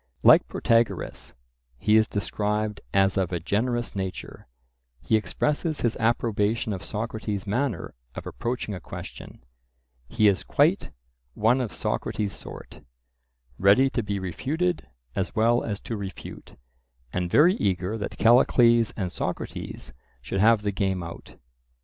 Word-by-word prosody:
Like -, -, +7 dB
Protagoras, 115 Hz, -1 st, 0 dB, 0.4 s
he 105 Hz, -, +2 dB
is 110 Hz, 0 st, +5 dB
described 105 Hz, 0 st, -2 dB
as 95 Hz, 0 st, +3 dB
of 95 Hz, -2 st, 0 dB
a 85 Hz, -, -1 dB
generous 120 Hz, +7 st, -1 dB
nature; 95 Hz, -2 st, -6 dB, 0.5 s
he 110 Hz, -, +1 dB
expresses 150 Hz, -, -1 dB
his 120 Hz, -, +1 dB
approbation 110 Hz, -1 st, +1 dB
of 95 Hz, -, -6 dB
Socrates' 105 Hz, -2 st, -4 dB
manner 120 Hz, -1 st, -2 dB, 0.2 s
of -, -, -7 dB
approaching 120 Hz, -3 st, -3 dB
a 95 Hz, -, -5 dB
question; 80 Hz, -, -10 dB, 0.6 s
he 105 Hz, -, +3 dB
is 95 Hz, -6 st, +2 dB
quite -, -, +2 dB, 0.5 s
"one 120 Hz, +5 st, +3 dB
of 115 Hz, -6 st, -3 dB
Socrates' 100 Hz, -2 st, -2 dB
sort, -, -, -11 dB, 0.8 s
ready 115 Hz, +8 st, +5 dB
to 120 Hz, -, 0 dB
be 105 Hz, -2 st, -3 dB
refuted 135 Hz, -, -2 dB, 0.3 s
as 95 Hz, +3 st, -2 dB
well 115 Hz, +2 st, +3 dB
as 105 Hz, -2 st, -3 dB
to 115 Hz, -, -5 dB
refute," 100 Hz, -3 st, -8 dB, 0.6 s
and 90 Hz, -1 st, -1 dB
very 160 Hz, -, +6 dB
eager 95 Hz, -, 0 dB
that 105 Hz, -, -5 dB
Callicles 120 Hz, -1 st, +5 dB
and 95 Hz, -5 st, -2 dB
Socrates -, -, -5 dB, 0.3 s
should 60 Hz, +11 st, -4 dB
have 110 Hz, +1 st, +5 dB
the 105 Hz, -, 0 dB
game 95 Hz, -2 st, -1 dB
out. 85 Hz, 0 st, -10 dB
105 Hz, 135 wpm, -26 LUFS, 95-115 Hz, 0.8 s, Like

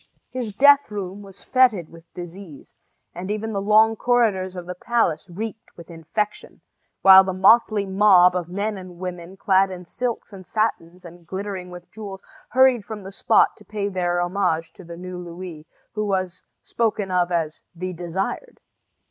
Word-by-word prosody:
His 250 Hz, -4 st, -4 dB
death 285 Hz, +3 st, +6 dB
room 200 Hz, -1 st, -6 dB
was 195 Hz, -1 st, -13 dB
fetid 240 Hz, -11 st, +2 dB
with 165 Hz, 0 st, -16 dB
disease, 175 Hz, -3 st, -10 dB, 0.4 s
and 180 Hz, +2 st, -7 dB
even 215 Hz, +1 st, -3 dB
the 200 Hz, -, -1 dB
long 215 Hz, +2 st, +4 dB
corridors 215 Hz, -6 st, +1 dB
of 180 Hz, -1 st, -7 dB
the 180 Hz, -, -5 dB
palace 190 Hz, -3 st, -1 dB
reeked 220 Hz, +5 st, -7 dB
with 170 Hz, 0 st, -12 dB
infection, 170 Hz, +6 st, -4 dB, 0.4 s
while 190 Hz, 0 st, +10 dB
the 190 Hz, -1 st, -3 dB
motley 210 Hz, +1 st, +4 dB
mob 190 Hz, -2 st, +5 dB
of 175 Hz, -2 st, -3 dB
men 200 Hz, +2 st, -3 dB
and 180 Hz, -2 st, -11 dB
women, 180 Hz, 0 st, -7 dB
clad 195 Hz, 0 st, +3 dB
in 180 Hz, -1 st, -8 dB
silks 235 Hz, +3 st, -4 dB
and 190 Hz, -1 st, -10 dB
satins 180 Hz, -4 st, -2 dB
and 170 Hz, 0 st, -13 dB
glittering 190 Hz, -1 st, -5 dB
with 180 Hz, 0 st, -12 dB
jewels, 200 Hz, -3 st, -9 dB, 0.3 s
hurried 260 Hz, -3 st, +4 dB
from 210 Hz, -1 st, -8 dB
the 195 Hz, -, -8 dB
spot -, -, +3 dB
to -, -, -17 dB
pay 205 Hz, 0 st, -3 dB
their 175 Hz, -2 st, -1 dB
homage 175 Hz, -3 st, -1 dB
to 190 Hz, -, -14 dB
the 170 Hz, 0 st, -10 dB
new 180 Hz, 0 st, -7 dB
Louis, 170 Hz, -2 st, -9 dB, 0.3 s
who 215 Hz, -1 st, -2 dB
was 185 Hz, -2 st, -2 dB, 0.2 s
spoken 210 Hz, -4 st, -1 dB
of 180 Hz, -1 st, +1 dB
as 160 Hz, -3 st, -2 dB
"the 185 Hz, +2 st, -5 dB
Desired." 180 Hz, -, -4 dB
190 Hz, 170 wpm, -23 LUFS, 175-210 Hz, 0.4 s, while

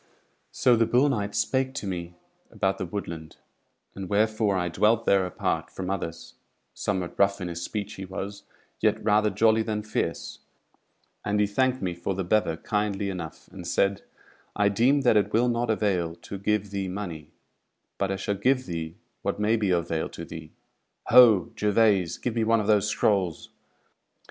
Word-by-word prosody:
So 125 Hz, -2 st, +3 dB
the 115 Hz, -1 st, +2 dB
bull 125 Hz, +5 st, +3 dB
knight 105 Hz, -6 st, -2 dB
spake 130 Hz, 0 st, 0 dB
to 110 Hz, -, -4 dB
me 90 Hz, -2 st, -5 dB, 0.3 s
about 95 Hz, 0 st, -1 dB
the 95 Hz, -, -3 dB
woodland, 85 Hz, -4 st, -6 dB, 0.6 s
and 95 Hz, -2 st, -7 dB
wherefore 105 Hz, -1 st, +2 dB
I 90 Hz, -1 st, 0 dB
dwelt 110 Hz, +6 st, +2 dB
there 95 Hz, -2 st, +3 dB
apart -, -, -2 dB
from 95 Hz, 0 st, -5 dB
others; 85 Hz, -4 st, -5 dB, 0.4 s
somewhat 95 Hz, -4 st, -3 dB
rough 100 Hz, 0 st, +3 dB
in 90 Hz, -2 st, -4 dB
his 85 Hz, 0 st, -5 dB
speech 105 Hz, +3 st, -4 dB
he 95 Hz, -, -7 dB
was, 100 Hz, +1 st, -6 dB, 0.4 s
yet -, -, +1 dB
rather 105 Hz, 0 st, +3 dB
jolly 110 Hz, +1 st, +3 dB
than 110 Hz, -1 st, -2 dB
fierce; 95 Hz, -5 st, -3 dB, 0.8 s
and 105 Hz, 0 st, 0 dB
he 105 Hz, -, +4 dB
thanked 130 Hz, +3 st, 0 dB
me 90 Hz, -2 st, -1 dB
for 85 Hz, +2 st, -3 dB
the 95 Hz, -, -2 dB
bever 90 Hz, -3 st, +1 dB
kindly 105 Hz, 0 st, -1 dB
enough, 85 Hz, -4 st, -7 dB
and 90 Hz, -3 st, -9 dB
said: 100 Hz, +3 st, +1 dB, 0.5 s
"I 105 Hz, -1 st, +3 dB
deem 125 Hz, +8 st, +3 dB
that 120 Hz, -5 st, +4 dB
it 105 Hz, -, +1 dB
will 120 Hz, +3 st, +3 dB
not 120 Hz, 0 st, -1 dB
avail 95 Hz, -6 st, 0 dB
to 100 Hz, +3 st, -8 dB
give 105 Hz, 0 st, 0 dB
thee 100 Hz, -1 st, -2 dB
money; 90 Hz, -6 st, -6 dB, 0.7 s
but 100 Hz, -, 0 dB
I 95 Hz, -, -1 dB
shall 95 Hz, +2 st, -2 dB
give 130 Hz, +6 st, +1 dB
thee 80 Hz, -2 st, -5 dB, 0.3 s
what -, -, -2 dB
may 105 Hz, +2 st, +2 dB
be 105 Hz, -3 st, 0 dB
of 85 Hz, -2 st, +2 dB
avail 80 Hz, -1 st, -2 dB
to -, -, -8 dB
thee. -, -, -9 dB, 0.6 s
Ho, 110 Hz, -8 st, +7 dB
Gervaise! 105 Hz, -4 st, +2 dB
give 120 Hz, -, -3 dB
me 115 Hz, -1 st, 0 dB
one 115 Hz, +1 st, +3 dB
of 105 Hz, -, -2 dB
those 105 Hz, -1 st, +3 dB
scrolls!" 95 Hz, -5 st, 0 dB
100 Hz, 180 wpm, -26 LUFS, 90-110 Hz, 0.8 s, Ho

